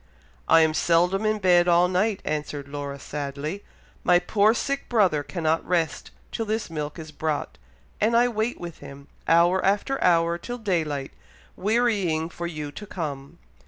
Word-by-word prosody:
"I 165 Hz, -, +6 dB
am 160 Hz, -1 st, +3 dB
seldom 180 Hz, +6 st, +2 dB
in 215 Hz, 0 st, +1 dB
bed 180 Hz, -3 st, +4 dB
all 175 Hz, +1 st, +5 dB
night," 190 Hz, +3 st, 0 dB
answered 150 Hz, -2 st, -3 dB
Laura, 140 Hz, -1 st, -5 dB
sadly. 145 Hz, +6 st, -5 dB, 0.4 s
"My 180 Hz, -, +5 dB
poor 205 Hz, +5 st, +3 dB
sick 275 Hz, +3 st, -3 dB
brother 190 Hz, -11 st, +3 dB
cannot 160 Hz, +1 st, -1 dB
rest 170 Hz, -4 st, -1 dB, 0.2 s
till 225 Hz, -, -3 dB
this 215 Hz, -4 st, -2 dB
milk 150 Hz, -1 st, -4 dB
is 160 Hz, -2 st, -8 dB
brought, 150 Hz, -, -3 dB, 0.4 s
and 230 Hz, +2 st, +3 dB
I 240 Hz, +1 st, +5 dB
wait 230 Hz, 0 st, -2 dB
with 170 Hz, -2 st, -8 dB
him, 140 Hz, 0 st, -12 dB, 0.2 s
hour 175 Hz, +3 st, +4 dB
after 205 Hz, +8 st, +1 dB
hour 170 Hz, -1 st, +3 dB
till 245 Hz, +6 st, -6 dB
daylight, 160 Hz, -, -2 dB, 0.4 s
wearying 200 Hz, -7 st, +1 dB
for 170 Hz, -1 st, -5 dB
you 150 Hz, -3 st, -6 dB
to 210 Hz, +8 st, -9 dB
come." 140 Hz, -7 st, -6 dB
170 Hz, 160 wpm, -25 LUFS, 155-205 Hz, 0.4 s, I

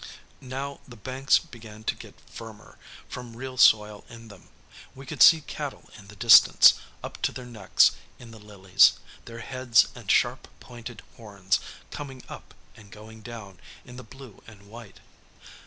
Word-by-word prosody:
Now, 135 Hz, +2 st, -7 dB
the 120 Hz, -, -13 dB
banks 130 Hz, +5 st, 0 dB
began 110 Hz, -8 st, -12 dB
to -, -, -1 dB
get -, -, -15 dB
firmer, 110 Hz, -2 st, -14 dB, 0.3 s
from 120 Hz, -2 st, -10 dB
real 130 Hz, +1 st, -8 dB
soil 105 Hz, -4 st, +3 dB
in 115 Hz, -1 st, -13 dB
them. 100 Hz, -3 st, -17 dB, 0.5 s
We 135 Hz, +1 st, -12 dB
could -, -, -7 dB
see 160 Hz, -1 st, +7 dB
cattle 145 Hz, -1 st, -8 dB
in 100 Hz, -2 st, -15 dB
the 100 Hz, -, -15 dB
distance, 115 Hz, +3 st, +7 dB, 0.3 s
up -, -, -9 dB
to -, -, -1 dB
their 125 Hz, -, -10 dB
necks 110 Hz, -6 st, +2 dB, 0.3 s
in 120 Hz, -2 st, -14 dB
the 110 Hz, -, -14 dB
lilies, 100 Hz, -3 st, +3 dB, 0.3 s
their 115 Hz, -1 st, -10 dB
heads 130 Hz, -2 st, +1 dB
and -, -, -13 dB
sharp -, -, +1 dB
pointed 120 Hz, -1 st, -12 dB
horns 100 Hz, -5 st, -3 dB, 0.3 s
coming 135 Hz, -3 st, -9 dB
up -, -, -13 dB, 0.2 s
and 105 Hz, -2 st, -17 dB
going 110 Hz, +1 st, -14 dB
down 110 Hz, -5 st, -11 dB, 0.3 s
in 125 Hz, 0 st, -13 dB
the 130 Hz, -, -10 dB
blue 130 Hz, -2 st, -15 dB
and 105 Hz, -3 st, -16 dB
white. 115 Hz, -3 st, -14 dB
115 Hz, 160 wpm, -25 LUFS, 105-130 Hz, 0.5 s, see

